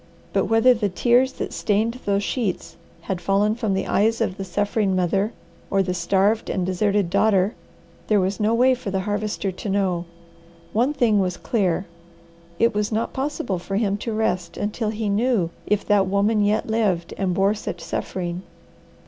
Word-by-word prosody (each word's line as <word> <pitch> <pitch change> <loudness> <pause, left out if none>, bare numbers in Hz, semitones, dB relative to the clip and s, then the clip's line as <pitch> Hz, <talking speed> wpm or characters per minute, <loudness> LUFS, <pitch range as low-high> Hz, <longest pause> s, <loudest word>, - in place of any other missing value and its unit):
But - - +2
whether 225 +3 +5
the 215 -4 -1
tears 245 +7 +3
that - - -5
stained 225 +4 0
those 200 0 +1
sheets 210 -5 -2 0.3
had 180 0 -4
fallen 200 +4 +2
from 220 -4 -1
the 195 - -1
eyes 225 +3 +2
of 220 -5 0
the 195 - -4
suffering 205 0 0
mother 195 +4 +1 0.4
or 195 0 +2
the 180 -1 -2
starved 195 +5 +1
and 185 -2 -1
deserted 195 0 +1
daughter, 200 0 +3 0.5
there 210 -2 +3
was 190 +2 -1
no 215 +1 +2
way 255 +2 +5
for 250 -5 -5
the 190 0 -1
Harvester 205 0 -2
to 185 +3 -6
know. 190 -3 0 0.7
One 245 +6 +2
thing 235 -8 +2
was 180 -2 -1
clear: 190 -5 0 0.7
It 230 +3 +3
was 210 +1 -1
not 225 +1 -1
possible 265 -9 -2
for 195 +3 -5
him 200 -1 +1
to 230 - -4
rest 185 -6 -1
until 210 +2 -2
he 215 0 -3
knew 205 -4 +1 0.2
if 210 -1 +1
that 200 -2 +3
woman 205 +2 +2
yet 210 +1 +1
lived 205 -7 0
and 185 -2 -1
bore 195 +2 +3
such 215 - -6
suffering. 175 -1 -4
205 Hz, 175 wpm, -23 LUFS, 190-220 Hz, 0.7 s, whether